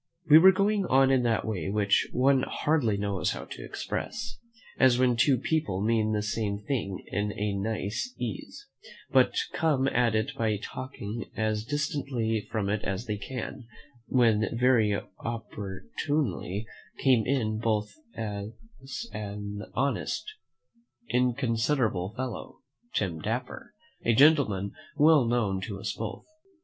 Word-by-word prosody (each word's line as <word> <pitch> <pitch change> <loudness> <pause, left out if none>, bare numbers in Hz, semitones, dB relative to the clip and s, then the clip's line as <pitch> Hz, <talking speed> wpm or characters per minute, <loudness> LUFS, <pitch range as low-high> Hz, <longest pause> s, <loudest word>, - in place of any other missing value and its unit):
We 155 +1 +9
were 190 +3 +9
going 200 +1 +1
on 135 0 +5
in 130 -2 +4
that 115 -2 +1
way 95 -6 -2
which 100 -1 +2
one 135 +1 +3
hardly 130 -8 +1
knows 100 -2 -1
how - - -7
to - - -9
express; 235 +2 -5 0.4
as 130 -2 +6
when 125 -1 +3
two 130 +3 +4
people 145 -7 -1
mean 110 +1 +2
the 105 -1 0
same 105 -1 -1
thing 105 -4 -3
in 105 0 0
a 105 0 -1
nice 110 - -2
case, 415 - -6 0.4
but - - +4 0.2
come 145 -5 +2
at 120 -3 +2
it 110 0 0
by 110 -2 0
talking 115 0 -6
as 110 -1 0
distantly 130 -5 -1
from 105 -3 -1
it 105 +1 0
as 100 +4 -3
they 105 -2 -2
can; 125 +2 -6 0.4
when 115 -4 +3
very 115 -5 +3 0.2
opportunely 105 - -3 0.3
came 125 -5 +3
in 110 -5 0
upon 110 -1 -3 0.3
us 140 - -6
an 105 0 -5
honest, 140 +2 -1 0.8
inconsiderable 120 -5 +1
fellow, 130 -2 -5 0.3
Tim 90 -6 -1
Dapper, 125 - -4 0.3
a 115 - +3
gentleman 125 -9 +4 0.3
well 150 -3 +6
known 105 -5 +1
to 100 +1 -5
us - - -3
both. - - -6
115 Hz, 135 wpm, -28 LUFS, 105-130 Hz, 0.8 s, We